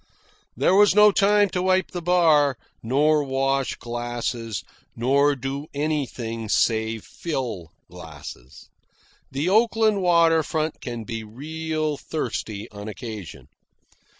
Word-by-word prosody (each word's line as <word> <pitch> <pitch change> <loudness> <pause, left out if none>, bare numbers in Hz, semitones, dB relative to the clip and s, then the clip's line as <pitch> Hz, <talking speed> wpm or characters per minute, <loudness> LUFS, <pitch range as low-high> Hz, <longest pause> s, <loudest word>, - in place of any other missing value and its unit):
There - - +3
was 205 0 +5
no 210 0 +7
time 205 +1 +4
to 180 - -1
wipe 185 0 +1
the 175 - -4
bar, 160 -6 +3 0.2
nor 145 +5 +2
wash 135 0 0
glasses, 120 -2 -4 0.3
nor 140 +4 +3
do 135 +3 -5
anything 125 -7 -3
save 110 0 +1
fill 120 - -4 0.2
glasses. 60 +2 -11 0.6
The 140 +5 -2
Oakland 220 0 +3
water 170 -2 +4
front 155 0 -3
can 120 -2 -5
be 115 0 -5
real 155 +6 -3
thirsty 110 -9 -4
on 105 0 -8
occasion. 110 -4 -8
140 Hz, 115 wpm, -24 LUFS, 115-165 Hz, 0.6 s, no